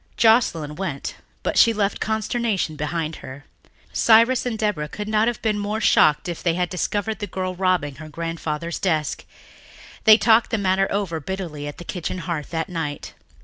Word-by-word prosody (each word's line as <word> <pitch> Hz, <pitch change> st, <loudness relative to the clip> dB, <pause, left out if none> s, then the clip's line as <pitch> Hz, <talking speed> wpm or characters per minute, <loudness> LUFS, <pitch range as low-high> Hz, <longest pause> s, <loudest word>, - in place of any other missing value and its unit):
Joscelyn 170 Hz, -10 st, +3 dB
went 170 Hz, -8 st, -4 dB, 0.3 s
but -, -, +1 dB
she 230 Hz, -, +6 dB
left 205 Hz, -2 st, 0 dB
consternation 220 Hz, -5 st, -1 dB
behind 155 Hz, +2 st, -3 dB
her. 135 Hz, +2 st, -10 dB, 0.5 s
Cyrus 230 Hz, +3 st, +4 dB
and 230 Hz, -3 st, -2 dB
Deborah 205 Hz, -9 st, -1 dB
could 210 Hz, 0 st, -6 dB
not 215 Hz, +1 st, +2 dB
have 240 Hz, -2 st, -1 dB
been 215 Hz, -2 st, +1 dB
more 210 Hz, +2 st, -2 dB
shocked 150 Hz, -6 st, +4 dB
if 170 Hz, -2 st, -5 dB
they 170 Hz, -2 st, +1 dB
had 180 Hz, -1 st, 0 dB
discovered 205 Hz, +4 st, -2 dB
the 205 Hz, -, -4 dB
girl 185 Hz, 0 st, -3 dB
robbing 180 Hz, -7 st, 0 dB
her 155 Hz, 0 st, -9 dB
grandfather's 165 Hz, 0 st, -4 dB
desk. 155 Hz, -6 st, -1 dB, 0.8 s
They 215 Hz, -1 st, +9 dB
talked 225 Hz, 0 st, +4 dB
the 225 Hz, -, 0 dB
matter 195 Hz, -1 st, +2 dB
over 195 Hz, -5 st, -1 dB
bitterly 155 Hz, -3 st, -5 dB
at 145 Hz, -, -7 dB
the -, -, -8 dB
kitchen 180 Hz, -1 st, -4 dB
hearth 165 Hz, -4 st, -4 dB
that 160 Hz, -1 st, -2 dB
night. 165 Hz, -5 st, -5 dB
185 Hz, 175 wpm, -22 LUFS, 160-215 Hz, 0.8 s, They